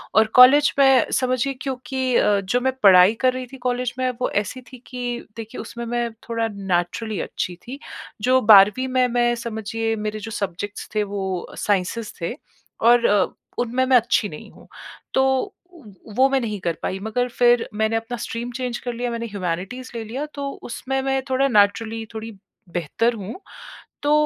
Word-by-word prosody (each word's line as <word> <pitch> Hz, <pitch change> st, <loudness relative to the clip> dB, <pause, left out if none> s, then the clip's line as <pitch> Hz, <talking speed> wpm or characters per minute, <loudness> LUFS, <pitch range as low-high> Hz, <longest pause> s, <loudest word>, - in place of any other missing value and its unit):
और 220 Hz, -, +6 dB
कॉलेज 270 Hz, +4 st, +8 dB
में 270 Hz, -3 st, +5 dB
समझिए 255 Hz, +1 st, 0 dB
क्योंकि 260 Hz, -1 st, -2 dB
अ, 205 Hz, -3 st, +3 dB
जो 195 Hz, +6 st, 0 dB
मैं 260 Hz, 0 st, +1 dB
पढ़ाई 185 Hz, 0 st, +8 dB
कर 255 Hz, -1 st, +3 dB
रही 255 Hz, 0 st, -5 dB
थी -, -, -8 dB
कॉलेज 250 Hz, -1 st, -2 dB
में 255 Hz, -, +1 dB
वो -, -, +1 dB
ऐसी 210 Hz, +5 st, -2 dB
थी 255 Hz, -, -10 dB
कि 245 Hz, -1 st, -4 dB, 0.2 s
देखिए 225 Hz, -1 st, -7 dB
उसमें 235 Hz, 0 st, -7 dB
मैं 240 Hz, 0 st, -1 dB, 0.2 s
थोड़ा 230 Hz, -1 st, 0 dB
नेचुरली 200 Hz, +1 st, -2 dB
अच्छी 180 Hz, -, -4 dB
थी। 270 Hz, +3 st, -7 dB, 0.4 s
जो 255 Hz, +4 st, +4 dB
12वीं 210 Hz, +4 st, +6 dB
में 255 Hz, -1 st, +2 dB
मैं 240 Hz, 0 st, +2 dB
समझिए 225 Hz, -1 st, -3 dB
मेरे 215 Hz, 0 st, -4 dB
जो 225 Hz, +1 st, -7 dB
सब्ज़ेक्टस 200 Hz, +1 st, -5 dB
थे 210 Hz, -, +2 dB
वो 190 Hz, -3 st, -4 dB
साइंसेस 205 Hz, +3 st, -1 dB
थे 170 Hz, -, -2 dB, 0.5 s
और 235 Hz, +1 st, +5 dB
अ, 205 Hz, -2 st, +4 dB, 0.3 s
उनमें 245 Hz, +2 st, +1 dB
मैं 260 Hz, -1 st, +6 dB
अच्छी 230 Hz, -3 st, +1 dB
नहीं 150 Hz, -, -10 dB
हूँ। -, -, -18 dB, 0.5 s
तो 265 Hz, -, +3 dB, 0.5 s
उ 340 Hz, -5 st, -16 dB, 0.3 s
वो 265 Hz, -, +6 dB
मैं 270 Hz, 0 st, +2 dB
नहीं 215 Hz, -3 st, -3 dB
कर 170 Hz, -3 st, -2 dB
पाई 190 Hz, -, -2 dB
मगर 220 Hz, +4 st, -1 dB
फिर 240 Hz, 0 st, +3 dB
मैंने 220 Hz, +1 st, 0 dB
अपना 225 Hz, +2 st, -3 dB
स्ट्रीम 235 Hz, +1 st, -5 dB
चेंज 245 Hz, 0 st, -3 dB
कर 245 Hz, -1 st, -4 dB
लिया 245 Hz, +1 st, -3 dB
मैंने 235 Hz, 0 st, -3 dB
ह्यूमैनिटीज़ 200 Hz, +5 st, -4 dB
ले 230 Hz, -, -3 dB
लिया 250 Hz, +7 st, -4 dB
तो 280 Hz, -1 st, -3 dB
उसमें 265 Hz, +3 st, -3 dB
मैं 270 Hz, 0 st, 0 dB
थोड़ा 265 Hz, +1 st, +2 dB
नेचुरली 220 Hz, 0 st, +2 dB
थोड़ी 225 Hz, +1 st, -6 dB, 0.4 s
बेहतर 180 Hz, +8 st, 0 dB
हूँ 210 Hz, -, -7 dB, 0.6 s
तो 290 Hz, +1 st, +2 dB
235 Hz, 180 wpm, -22 LUFS, 210-255 Hz, 0.6 s, कॉलेज